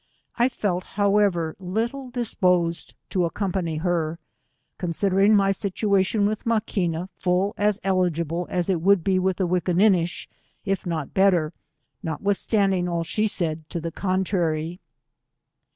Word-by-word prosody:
I 240 +2 +3
felt, 190 -7 -2
however, 200 -5 +2
little 230 +8 -3
disposed 180 -8 +1 0.2
to 190 - -1
accompaay 175 -2 -1
her, 170 -2 0 0.6
considering 195 +4 +2
my 195 -1 +4
situation 200 +1 +1
wiih 210 +1 0
Maquina 190 -6 -1
full 185 +3 0
as 210 0 +1
eligible 175 -3 0
as 175 -2 -1
it 180 -4 0
would 195 -1 +4
be 190 0 +2
with 185 0 0
VVickinQiDish, 180 0 +2 0.4
if 195 -1 -1
not 160 -5 -3
better, 180 -5 +3 0.5
notwithstandiDg 195 +2 0
all 170 -1 -1
she 215 +6 0
said 160 -5 -3
to 170 - -3
the 165 0 -4
con 185 +2 0
trary. 170 -2 -1
185 Hz, 125 wpm, -24 LUFS, 170-200 Hz, 0.6 s, my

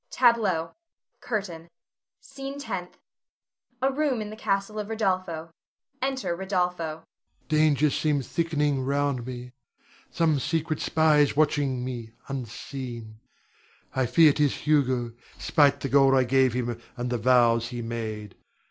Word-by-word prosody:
[Tableau. 210 -10 +2 0.5
CURTAIN. 180 -8 -4 0.5
SCENE 275 0 -8
TENTH. 190 -11 -5 0.9
[A 270 - +3
room 275 -3 0
in 210 -1 -5
the - - -7
castle 200 0 -1
of 210 - -4
Rodolpho. 185 -7 -1 0.5
Enter 260 -10 -1
Rodolpho.] 180 -1 -1
Rod. 160 -1 -5 0.4
Dangers 150 -2 +3
seem 150 -3 +1
thickening 150 -2 0
round 140 -2 -1
me. 125 -1 -7 0.6
Some 160 -4 +1
secret 155 +2 -1
spy 155 -2 +3
is 145 -1 +3
watching 140 -4 +1
me 120 -3 -6
unseen, 120 -3 -6 0.8
I 130 -1 +1
fear 155 +2 +6
'tis 145 -2 +1
Hugo, 130 -6 +2 0.2
spite 140 -2 +3
the - - -1
gold 135 0 +5
I 130 - +4
gave 130 0 +3
him, 120 -1 -3 0.2
and 125 0 -3
the 120 - 0
vows 115 -1 +4
he 120 -1 -5
made. 110 -3 -5
150 Hz, 130 wpm, -26 LUFS, 125-180 Hz, 0.9 s, fear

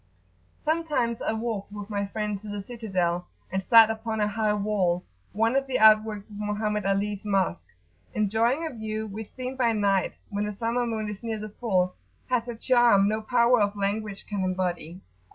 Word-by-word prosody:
Sometimes 300 -8 0
I - - 0
walked 220 -3 -3
with 205 0 -7
my 200 -1 -1
friend 210 -1 -3
to 215 - -10
the 205 -1 -5
citadel, 185 -6 -2 0.2
and 190 +1 -1
sat 225 -1 +8
upon 220 0 -3
a 210 - +2
high 210 0 0
wall, 200 -4 0 0.3
one 225 +5 +1
of 275 0 +1
the 260 - 0
outworks 215 -1 +4
of 205 - -9
Mohammed 210 0 -1
Ali's 200 +1 0
Mosque, 195 -4 0 0.5
enjoying 225 +8 +1
a 315 - -4
view 220 -1 -4
which, 215 0 -7
seen 255 0 -5
by 240 -3 +2
night, 200 -3 +1 0.2
when 205 +1 -1
the 210 - -3
summer 235 +3 -1
moon 220 -2 -2
is 210 -2 -6
near 225 -2 -3
the 215 0 -6
full, 185 -5 0 0.4
has 245 -1 +1
a 240 - -4
charm 235 -4 +4
no 215 +1 0
power 240 +1 +3
of 205 0 +1
language 205 0 -2
can 200 -2 -3
embody. 180 -2 -2
215 Hz, 185 wpm, -26 LUFS, 200-230 Hz, 0.5 s, sat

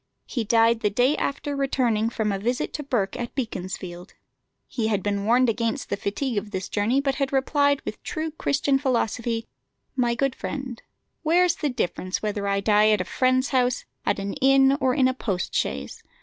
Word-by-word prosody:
He 240 - -2
died 230 +1 +4
the 210 - +1
day 250 +8 +2
after 285 +1 -2
returning 245 -5 +1
from 220 -3 -1
a 195 - -2
visit 245 +5 -1
to 300 - -3
Burke 245 -5 -1
at 240 -1 -5
Beaconsfield. 185 -6 -5 0.5
He 230 -4 -2
had 205 -4 0
been 200 -1 -1
warned 245 +3 +4
against 230 0 -1
the - - +2
fatigue 205 +4 -2
of 205 - -11
this 190 -2 -4
journey, 220 +6 +1
but 275 -1 0
had 275 - +1
replied 285 +1 +2
with - - -6
true 315 -1 -3
Christian 280 -2 +1
philosophy, 235 -3 -1 0.5
"My 240 -2 +1
good 275 +1 0
friend, 260 -3 -5 0.4
where's 345 +2 +3
the 295 - -1
difference 185 -6 -2
whether 205 -1 -2
I 200 0 +1
die 210 +1 +4
at 210 -2 +3
a - - -3
friend's 255 +5 +1
house, 250 -2 +1 0.2
at - - +1
an 195 0 -3
inn, 270 0 +5
or 255 -1 +2
in 265 -3 +4
a 260 - +1
post 195 -8 -3
chaise? - - -2
240 Hz, 190 wpm, -25 LUFS, 210-270 Hz, 0.5 s, inn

